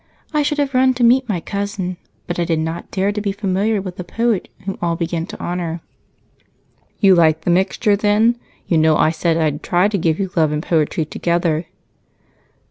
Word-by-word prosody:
I 300 - +2
should 295 +1 0
have 280 -2 0
run 255 0 +3
to 245 - 0
meet 250 +1 +4
my 190 -5 0
cousin, 200 -1 -4 0.3
but 175 0 -4
I - - +2
did 165 -1 0
not 160 +1 -4
dare 195 +1 0
to 210 0 -3
be 205 -1 -1
familiar 200 +1 -1
with 185 -2 -7
the 180 - -5
poet 225 +2 -1
whom 195 0 -5
all 170 -1 0
begin 165 0 -3
to - - -9
honor." 175 -1 -3 1.2
"You 195 -3 +6
like 160 -2 +4
the 175 - 0
mixture, 190 +4 +2
then? 210 +3 +2 0.3
You 165 - +2
know 155 0 +4
I 155 - +3
said 165 0 0
I'd 155 -2 0
try 180 +2 +2
to 205 -2 -1
give 165 -1 +1
you 190 -2 -2
love 160 -3 +3
and 150 +1 -2
poetry 160 -1 0
together." 170 0 -1
180 Hz, 200 wpm, -19 LUFS, 165-205 Hz, 1.2 s, You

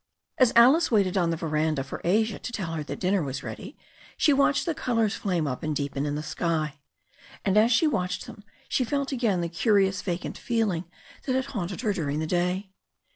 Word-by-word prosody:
As 255 -3 +5
Alice 265 +9 +6
waited 200 -5 +2
on 175 -3 +2
the 165 - -1
veranda 155 -3 0
for 135 - -7
Asia 215 +4 +1
to - - -6
tell 190 -8 -4
her 160 - -2
that - - -6
dinner 190 +1 +1
was 135 -3 -4
ready, - - -8 0.4
she 295 - +4
watched 280 +1 +3
the 335 - 0
colours 230 -7 0
flame 180 -6 -1
up 130 -3 -3
and 155 -1 -2
deepen 140 0 -2
in 145 - -2
the 150 - -3
sky, 155 -2 -2 0.7
and 195 -1 +2
as 220 +3 +5
she 245 +7 +4
watched 180 -11 -1
them 205 - -11 0.2
she 255 - +1
felt 280 +3 -1
again 230 -9 +1
the 170 - -1
curious 195 +2 +2
vacant 180 -2 -4
feeling 215 -8 0 0.4
that 255 - +1
had 260 0 0
haunted 190 -2 -3
her 215 -5 +1
during 150 -6 -2
the 160 - -1
day. 180 +3 -1
190 Hz, 205 wpm, -26 LUFS, 160-230 Hz, 0.7 s, Alice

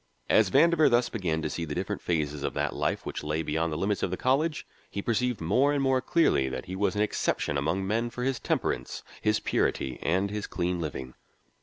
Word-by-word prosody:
As 110 -3 +5
Vandover 160 - +5
thus 120 0 +3
began 85 -8 -2
to 75 - -1
see 85 - -3
the 75 -2 -4
different 95 +2 -3
phases 75 -4 -1
of - - -3
that - - -1
life - - -1
which - - -5
lay 75 +2 -1
beyond 80 +2 -1
the 75 - -2
limits 100 +4 0
of - - 0
the 95 - -3
college, 150 +5 +1 0.2
he - - -5
perceived 120 +2 0
more 125 - +2
and 140 -1 +1
more 130 -1 +2
clearly 120 - +2
that 65 - -5
he 95 0 -6
was 100 +2 0
an 105 - +2
exception 90 -7 -1
among 80 +7 0
men 115 +4 0
for 125 +1 -5
his 130 -1 0
temperance, - - -2 0.2
his 105 0 +2
purity, 65 -10 -1
and 95 +4 +1
his 105 0 -3
clean 90 0 -1
living. 65 -5 -5
95 Hz, 215 wpm, -28 LUFS, 80-125 Hz, 0.2 s, As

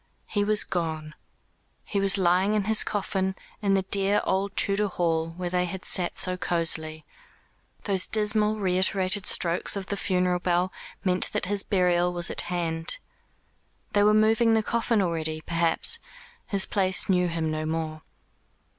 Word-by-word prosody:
He 205 -1 -1
was 210 +1 +3
gone. 160 -3 -4 0.7
He 200 - -2
was 195 0 +1
lying 185 +3 +2
in 210 - +1
his 220 +2 +3
coffin, 190 -2 -2 0.3
in 200 -2 +2
the 190 - +1
dear 200 +1 +1
old 195 +1 -1
Tudor 205 +1 +2
hall 165 -3 -1
where 180 -1 -4
they 180 0 +1
had 185 +1 -7
sat 180 -2 +1
so 185 0 +2
cosily. 160 -3 -1 0.8
Those 195 -3 +2
dismal 215 0 +2
reiterated 190 +1 +1
strokes 170 +3 +2
of 195 -1 -4
the 200 - -3
funeral 180 -2 0
bell 180 +1 0 0.3
meant 185 -2 +1
that - - -1
his 200 +1 -1
burial 180 -3 +1
was 175 -1 +1
at - - +1
hand. 165 - -1 1.0
They 205 - +3
were 210 +1 +4
moving 225 +1 +3
the 220 - +1
coffin 230 -2 0
already, 160 -3 -2
perhaps. 165 0 0 0.5
His 200 -2 +2
place 190 -2 0
knew 180 -2 +2
him 165 -2 -2
no 155 0 -3
more. 160 -1 -4
185 Hz, 155 wpm, -26 LUFS, 170-200 Hz, 1.0 s, were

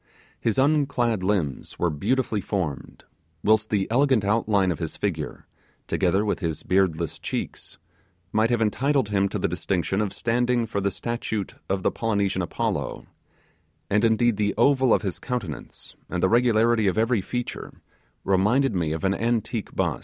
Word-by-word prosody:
His 115 - 0
unclad 135 -6 +2
limbs 90 -8 -1
were 85 - +1
beautifully 110 - 0
formed; 90 -10 -4 0.4
whilst 110 0 +3
the 100 -2 +1
elegant 130 -4 +3
outline 100 -3 +2
of 80 - -4
his - - -4
figure, - - -3 0.4
together 95 +4 +1
with 105 - -1
his 80 -5 -3
beardless 90 -3 0
cheeks, - - -5 0.5
might 110 +1 +2
have 120 -2 +2
entitled 135 +2 +1
him 100 -1 +1
to - - -3
the 90 - 0
distinction 90 +3 -1
of 105 -2 -1
standing 120 0 +1
for 100 -2 -3
the 100 - +1
statue 110 0 -3 0.3
of 95 -1 -1
the - - +2
Polynesian 100 -4 0
Apollo; 85 - -2 0.9
and 105 +2 +3
indeed 115 0 +3
the 105 -1 0
oval 130 -3 +4
of - - +3
his 95 -3 -3
countenance 110 - -5
and 90 -1 -2
the 95 - +4
regularity 115 -2 +3
of 95 - +1
every 115 -1 +2
feature 120 +5 -5 0.5
reminded 105 +7 +2
one 80 -3 0
of 80 - -5
an 95 0 +2
antique 115 0 -2
bust. - - 0
105 Hz, 160 wpm, -25 LUFS, 95-120 Hz, 0.9 s, oval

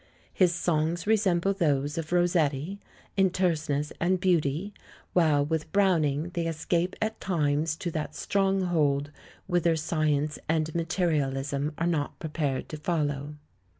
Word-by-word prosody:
His 180 -3 +4
songs 165 0 0
resemble 195 -3 +2
those 145 -6 0
of 165 -1 -4
Ros 175 0 +3
setti 160 +3 0 0.4
in 195 -1 +4
terseness 155 -5 0
and 180 +2 +2
beauty, 175 +1 +1 0.4
while 155 -5 +3
with 160 +1 -2
Brown 190 -5 +3
ing 145 +3 -1
they 170 -2 -2
escape 170 +3 -1
at 220 0 -2
times 155 -3 0
to 170 +1 -4
that 155 -2 -4
stronghold 175 -8 +1 0.3
whither 175 -2 +2
science 155 -2 0
and 160 -1 +1
materialism 150 -4 -1
are 165 - 0
not 160 -4 -1
prepared 150 -4 -2
to 155 - -5
follow. 150 -3 -2
160 Hz, 135 wpm, -28 LUFS, 150-175 Hz, 0.4 s, His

